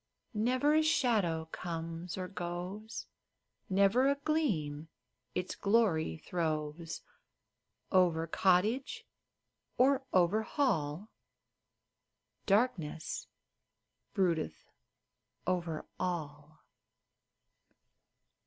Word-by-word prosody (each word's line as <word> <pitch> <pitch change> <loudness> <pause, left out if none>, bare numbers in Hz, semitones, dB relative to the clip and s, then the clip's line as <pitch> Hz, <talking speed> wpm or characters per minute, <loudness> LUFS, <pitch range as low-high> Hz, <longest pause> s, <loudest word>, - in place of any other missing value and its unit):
Never 255 +7 +2
a 310 - +5
shadow 210 - +2
comes 165 0 -5
or 185 -1 -3
goes, 185 +3 -5 0.6
Never 200 +8 +4
a 280 - +3
gleam 200 - -1 0.5
its 180 0 -2
glory 200 - +2
throws 160 - -3 0.9
Over 175 -4 +4
cottage 195 - +2 0.7
or 270 +2 +5
over 185 +4 +4
hall 200 - 0 0.7
— - - -52
Darkness 195 -8 0 0.9
broodeth 175 -6 0 0.8
over 170 -3 -1
all 155 -4 -4
180 Hz, 70 wpm, -33 LUFS, 160-220 Hz, 0.9 s, a